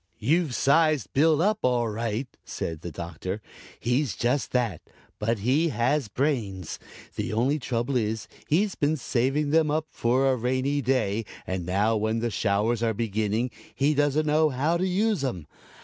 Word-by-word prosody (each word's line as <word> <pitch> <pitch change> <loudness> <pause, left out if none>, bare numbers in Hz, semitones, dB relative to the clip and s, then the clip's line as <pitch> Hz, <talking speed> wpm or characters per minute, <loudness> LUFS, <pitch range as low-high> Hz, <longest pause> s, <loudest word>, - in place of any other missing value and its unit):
"You've 160 -3 +1
sized 155 -1 +3
Bill 155 +3 +4
up 210 +1 +2
all 125 -2 +2
right," 115 +3 -2 0.2
said 80 -1 -5
the 85 - -5
Doctor. 85 +5 -5 0.4
"He 125 +4 +1
is 140 -7 -3
just 125 +4 0
that, 120 -9 0 0.4
but 115 +2 0
he 135 +11 +2
has 135 0 +1
brains. 105 - -2 0.4
The - - -3
only 130 +7 +1
trouble 125 0 -2
is 110 -2 -1 0.2
he's 195 +6 +2
been 150 +2 0
saving 135 +4 0
them 160 -1 +4
up 155 +1 0
for 130 +3 +2
a - - +2
rainy 130 +4 0
day 115 -5 +1 0.2
and 95 -2 -3
now 105 +5 +2
when 110 +1 0
the 115 0 -1
showers 105 +3 +1
are 115 -2 +1
beginning 110 +2 -1 0.2
he 145 +2 +2
doesn't 145 +1 +2
know 155 +1 +3
how 145 +5 +1
to 185 +2 0
use 200 -2 +1
'em. 90 - -3
125 Hz, 165 wpm, -26 LUFS, 110-150 Hz, 0.4 s, Bill